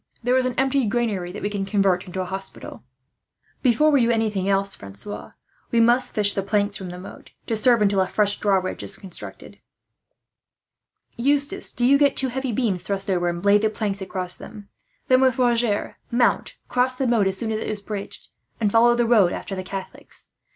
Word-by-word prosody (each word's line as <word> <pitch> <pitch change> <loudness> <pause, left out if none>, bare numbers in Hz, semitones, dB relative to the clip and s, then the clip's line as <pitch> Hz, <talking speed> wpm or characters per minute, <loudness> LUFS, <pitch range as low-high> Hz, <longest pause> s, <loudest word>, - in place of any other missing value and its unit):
There 245 +2 +2
is 260 -1 +2
an 250 - -4
empty 265 -2 +1
granary 205 -6 -1
that 205 - -8
we 205 - 0
will 205 -1 -3
convert 195 -3 +1
into 185 +1 -4
a - - -3
hospital." 190 +1 -7 0.8
"Before 280 +5 +3
we 280 -3 +4
do 235 - +2
anything 215 -4 0
else, 195 0 +1
Francois, 100 - -8 0.4
we 235 - +1
must 240 +2 +2
fish 205 -1 +3
the 195 - -1
planks 205 0 0
from 190 -2 -6
the 180 - -8
moat, 180 - -11 0.2
to 225 - -1
serve 235 0 +4
until 200 -1 +2
a 185 - +1
fresh 205 +1 +1
drawbridge 190 -2 0
is 195 - -1
constructed. 185 -3 -10 1.6
"Eustace, 285 +8 +1
do 245 - -1
you 280 +2 +5
get 285 -1 +3
two 265 - +4
heavy 265 0 -3
beams 210 -6 0
thrust 195 +1 -2
over, 175 -1 +1
and 175 +2 -5
lay 205 +1 +5
the 215 +1 +1
planks 205 -2 -3
across 185 -1 -1
them; 210 -2 -11 0.4
then 255 0 +4
with 260 -2 +3
Roger 235 -4 +1
mount, 240 0 +1
cross 255 +1 +1
the 265 - -2
moat 230 -5 +2
as 190 0 -1
soon 220 +2 -3
as 215 - -1
it - - -5
is 210 -2 -4
bridged, 205 -2 -7 0.3
and 210 -3 +1
follow 235 +2 +5
the 240 0 +1
road 215 -7 +4
after - - -6
the 185 - -4
Catholics. 190 +1 -9
210 Hz, 200 wpm, -23 LUFS, 195-240 Hz, 1.6 s, you